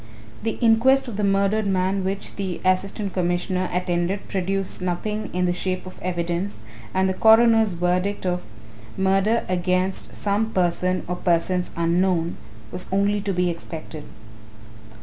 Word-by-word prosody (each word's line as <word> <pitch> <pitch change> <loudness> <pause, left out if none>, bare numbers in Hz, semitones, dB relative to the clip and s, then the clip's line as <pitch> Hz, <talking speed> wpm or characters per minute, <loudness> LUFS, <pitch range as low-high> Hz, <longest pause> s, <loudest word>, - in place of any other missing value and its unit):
The 225 0 -2
inquest 245 +4 +4
on 235 - -5
the 210 - -1
murdered 200 +2 +2
man 190 0 +1
which 195 +1 -4
the 190 -3 -3
Assistant 195 +2 0
Commissioner 180 +1 0
attended 180 +2 -1
produced 195 0 -2
nothing 210 +4 -2
in 180 0 0
the 175 - +1
shape 185 +1 -3
of 185 - -10
evidence 175 - -3 0.3
and 190 0 +2
the 190 - +1
coroner's 225 0 +5
verdict 180 +4 0
of 180 -1 -1 0.5
"murder 195 +4 +2
against 185 +1 -1
some 210 +2 0
person 185 0 +1
or 180 0 -2
persons 180 +1 +1
unknown" 170 0 +1 0.3
was 180 0 -5
only 200 +1 +2
to 200 - -2
be 180 -1 +1
expected. 160 -2 -8
185 Hz, 140 wpm, -23 LUFS, 180-200 Hz, 0.5 s, coroner's